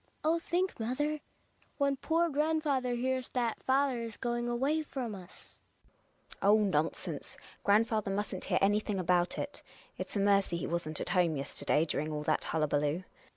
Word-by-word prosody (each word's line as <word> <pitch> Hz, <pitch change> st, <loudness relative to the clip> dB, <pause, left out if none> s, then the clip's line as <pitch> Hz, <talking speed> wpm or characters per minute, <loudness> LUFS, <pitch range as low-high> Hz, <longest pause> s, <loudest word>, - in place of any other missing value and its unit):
Oh, 325 Hz, +2 st, +3 dB
think, 355 Hz, 0 st, -1 dB
mother, 295 Hz, +7 st, -1 dB, 0.6 s
when 280 Hz, -1 st, +2 dB
poor 330 Hz, +5 st, +1 dB
grandfather 295 Hz, -4 st, +1 dB
hears 255 Hz, +1 st, -1 dB
that 240 Hz, -3 st, -1 dB
father 265 Hz, -1 st, +2 dB
is 230 Hz, -2 st, -6 dB
going 240 Hz, -1 st, -1 dB
away 275 Hz, +6 st, +1 dB
from 260 Hz, -7 st, -4 dB
us. 185 Hz, -2 st, -12 dB, 0.7 s
GiNA. -, -, -14 dB
Oh, 205 Hz, +2 st, +6 dB
nonsense! 165 Hz, -7 st, -1 dB, 0.3 s
Grandfather 215 Hz, 0 st, +3 dB
mustn't 195 Hz, -1 st, -2 dB
hear -, -, +1 dB
any 205 Hz, +2 st, +4 dB
thing 210 Hz, -2 st, -3 dB
about 180 Hz, -1 st, +2 dB
it. 290 Hz, -, -4 dB, 0.4 s
It's -, -, -5 dB
a -, -, +1 dB
mercv 200 Hz, -3 st, +3 dB
he -, -, -3 dB
wasn't 160 Hz, -2 st, -3 dB
at -, -, -3 dB
home 175 Hz, -4 st, +3 dB
yester 135 Hz, 0 st, -6 dB
day 155 Hz, -, +3 dB
during 155 Hz, 0 st, -2 dB
all 150 Hz, 0 st, -3 dB
that -, -, +1 dB
hullaballoo. 150 Hz, +1 st, 0 dB
220 Hz, 165 wpm, -32 LUFS, 180-270 Hz, 0.7 s, Oh